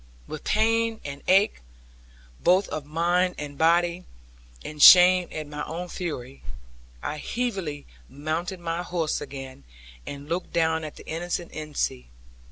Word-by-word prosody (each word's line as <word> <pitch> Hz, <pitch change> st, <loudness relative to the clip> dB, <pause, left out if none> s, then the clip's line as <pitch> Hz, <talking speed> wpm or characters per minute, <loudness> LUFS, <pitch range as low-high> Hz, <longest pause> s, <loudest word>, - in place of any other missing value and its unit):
With 155 Hz, -, -8 dB
pain, 225 Hz, +1 st, +1 dB
and 140 Hz, 0 st, -6 dB
ache, 195 Hz, -, +3 dB, 0.8 s
both 185 Hz, +3 st, +4 dB
of 150 Hz, -2 st, -5 dB
mind 175 Hz, +3 st, +1 dB
and 145 Hz, -1 st, -6 dB
body, 170 Hz, +3 st, +2 dB, 0.6 s
and 150 Hz, -1 st, -6 dB
shame 180 Hz, +1 st, +9 dB
at 155 Hz, -1 st, -5 dB
my 150 Hz, 0 st, -6 dB
own 175 Hz, +2 st, -6 dB
fury, 140 Hz, -8 st, -6 dB, 0.6 s
I 150 Hz, -, -3 dB
heavily 190 Hz, -, -3 dB, 0.2 s
mounted 160 Hz, +6 st, -4 dB
my 170 Hz, 0 st, -3 dB
horse 175 Hz, -3 st, -2 dB
again, 135 Hz, -, -8 dB, 0.4 s
and, 140 Hz, 0 st, -7 dB
looked 170 Hz, +3 st, -3 dB
down 160 Hz, -1 st, +1 dB
at 155 Hz, -, -7 dB
the -, -, -13 dB
innocent 175 Hz, +1 st, -4 dB
Ensie. 150 Hz, -, -3 dB
165 Hz, 135 wpm, -25 LUFS, 150-180 Hz, 0.8 s, shame